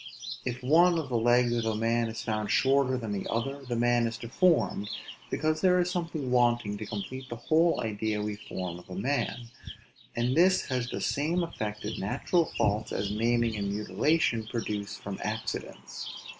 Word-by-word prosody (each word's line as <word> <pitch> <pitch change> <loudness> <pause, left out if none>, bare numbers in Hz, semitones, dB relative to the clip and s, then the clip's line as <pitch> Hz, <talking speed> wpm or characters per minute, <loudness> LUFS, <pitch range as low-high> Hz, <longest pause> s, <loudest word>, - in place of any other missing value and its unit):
If 125 0 -3
one 170 +6 +5
of 155 -4 -3
the 120 -2 +1
legs 120 +1 +4
of 115 - 0
a 110 -1 0
man 115 +1 +1
be 110 - -5
found 110 -2 -2
shorter 135 -1 +3
than 115 -4 -4
the 100 -1 -3
other, 135 +5 -2
the 125 -2 -3
man 120 0 +3
is 115 0 -4
deformed; 115 - +1 0.4
because 155 +1 0
there 180 -1 +5
is 180 0 +1
something 165 -7 -3
wanting 120 -4 +2
to 110 - -5
complete 130 +6 -5
the 120 - -4
whole 160 +8 +2
idea 110 -1 -1
we 105 0 -2
form 90 -4 -6
of 90 - -17
a 90 - -6
man; 120 +1 -2 0.6
and 120 +2 +1
this 185 +2 +4
has 125 -2 -1
the - - -4
same 165 +5 0
effect 105 -11 -4
in 110 - -3
natural 135 - +1
faults, 105 +2 +1
as 100 +1 -1
maiming 115 +1 +1
and 100 -1 -2
mutilation 110 - +1
produce 105 -3 -3
from 100 -1 -6
accidents. 110 +1 -5
120 Hz, 180 wpm, -29 LUFS, 105-140 Hz, 0.6 s, one